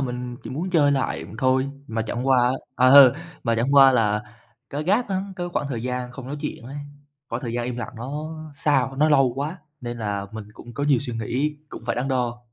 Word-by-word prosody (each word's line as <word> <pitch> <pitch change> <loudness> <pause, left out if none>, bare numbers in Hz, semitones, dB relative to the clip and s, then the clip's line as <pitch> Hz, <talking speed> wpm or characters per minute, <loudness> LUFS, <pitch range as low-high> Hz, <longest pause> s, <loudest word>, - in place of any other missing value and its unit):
mình 125 -2 -4
chỉ 115 - -7
muốn 165 +8 -3
chơi 145 -5 +4
lại 135 - -1
thôi, 130 +1 +2 0.2
mà 115 -2 -2
chẳng 120 +4 -3
qua 130 - +5 0.4
á 130 - +4
ờ, 140 -1 +9 0.3
mà 115 -2 +2
chẳng 130 +5 +1
qua 135 -1 +8
là 105 -3 +2 0.5
cái 145 +2 -3
gap 210 +7 +2
á, 190 -1 -1
cái 175 -1 -3
khoảng 145 - -1
thời 120 -4 -3
gian 125 0 -3
không 130 -1 -9
nói 145 - -4
chuyện - - -5
ấy, 135 +4 -8 0.5
khoảng - - -4
thời 120 - -3
gian 120 0 -1
im 125 0 -3
lặng 120 +1 -5
nó 145 +6 -5 0.2
xa 140 -4 +2
quá, 135 - -11
nó 155 +2 +4
lâu 135 -5 +4
quá, 150 +6 -3 0.2
nên 120 -1 -5
là 100 -2 -2
mình 110 -1 -6
cũng 120 +2 -12
có 145 - -2
nhiều 140 -4 +4
suy 120 - -5
nghĩ, 135 +7 -1
cũng - - -9
phải - - 0
đắn 130 +2 -1
đo. 125 -2 -1
130 Hz, 235 wpm, -24 LUFS, 120-145 Hz, 0.5 s, ờ